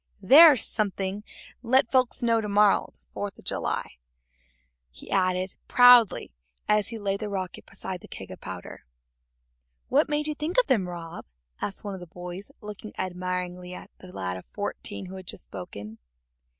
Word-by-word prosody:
"There's 280 - +8
something'll 200 -1 -2 0.4
let 250 0 +3
folks 255 -2 +2
know 230 -1 +3
to 210 - -4
morrow's 205 0 +2
the - - -45
Fourth 205 -1 -5
of - - -17
July," - - -3 0.9
he 60 - -12
added 185 0 +1
proudly, 245 - +6 0.4
as 210 -1 +3
he 230 - -5
laid 200 -2 -1
the 215 - -4
rocket 190 -3 -5
beside 190 -2 -6
the - - -12
keg - - -8
of - - -10
powder. - - -8 1.1
"What - - +3
made 300 0 0
you 305 - -1
think 305 - -4
of - - +4
them, 195 -8 +1
Rob?" 170 -1 -8 0.4
asked 200 - -4
one 205 -1 -4
of 190 - -7
the 175 - -10
boys, 180 +3 -8
looking 210 0 -9
admiringly 180 0 -4
at - - -11
the 185 - -12
lad 90 - -4
of 95 - -11
fourteen 100 +10 -5
who 190 +1 -8
had 185 -2 -11
just - - -4
spoken. 100 +3 -8
195 Hz, 170 wpm, -26 LUFS, 180-225 Hz, 1.1 s, There's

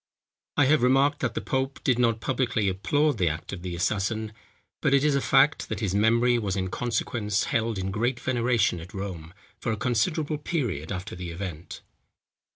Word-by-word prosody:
I 145 - +5
have 150 +3 +4
remarked, 135 +4 +3
that 125 - -2
the - - -1
pope 135 +1 -2
did 125 -2 +2
not 115 -2 +2
publicly 125 -5 0
applaud 145 +9 +1
the 90 -3 +3
act 80 +5 -5
of 95 - -6
the 90 -1 -5
assassin; 105 +5 -1 0.5
but 135 - +3
it 140 - +3
is 150 -1 +3
a 140 - +2
fact, 135 +3 +3
that 110 - -3
his 100 -5 -1
memory 115 +4 +3
was 100 -4 -2
in 95 -1 -2
consequence 110 -3 -1
held 115 -1 0
in 95 0 -2
great 120 +5 0
veneration 120 -7 +1
at 85 +5 -11
Rome, 90 -5 -6 0.3
for 115 - -2
a 110 - -2
considerable 145 - 0
period 120 - -2
after 95 +2 -5
the 90 -1 -6
event. 85 -1 -7
115 Hz, 185 wpm, -26 LUFS, 95-130 Hz, 0.5 s, I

